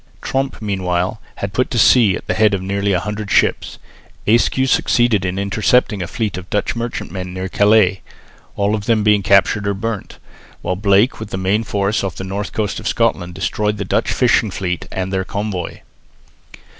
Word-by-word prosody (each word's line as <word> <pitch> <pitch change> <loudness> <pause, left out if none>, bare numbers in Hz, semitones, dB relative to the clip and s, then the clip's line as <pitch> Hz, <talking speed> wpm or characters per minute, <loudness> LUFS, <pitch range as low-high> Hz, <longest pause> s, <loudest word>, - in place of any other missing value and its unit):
Tromp 135 0 -2
meanwhile 95 0 -1
had 100 0 -5
put 125 +5 0
to 120 - -2
sea 110 -3 +5
at - - -7
the - - -1
head 105 -2 +3
of 95 - -4
nearly 100 +1 -1
a 90 - +2
hundred 105 +1 -5
ships. - - +1 0.5
Ayscue 120 +4 +2
succeeded 120 -5 +2
in 90 0 -2
intercepting 100 +2 +1
a 90 - -3
fleet 105 -5 -3
of 95 - -12
Dutch 105 - -1
merchantmen 95 -6 -5
near 95 0 -3
Calais, 100 -1 +3 0.5
all 100 +1 +1
of 105 -2 -2
them 110 -3 +2
being 105 -1 +4
captured 100 +2 +3
or 100 - 0
burnt, 110 0 -5 0.5
while 90 - -1
Blake 100 +4 +2
with 110 -2 -7
the 95 - -4
main 95 +4 +1
force 100 0 -1
off 95 -3 -3
the - - -6
north 100 +2 -4
coast 105 -2 -2
of - - -5
Scotland 90 -7 0
destroyed 105 +2 -1
the 100 - -3
Dutch - - 0
fishing - - +2
fleet 90 -2 -3
and 95 +1 -3
their 95 0 0
convoy. 100 -2 -4
100 Hz, 185 wpm, -18 LUFS, 95-110 Hz, 0.5 s, sea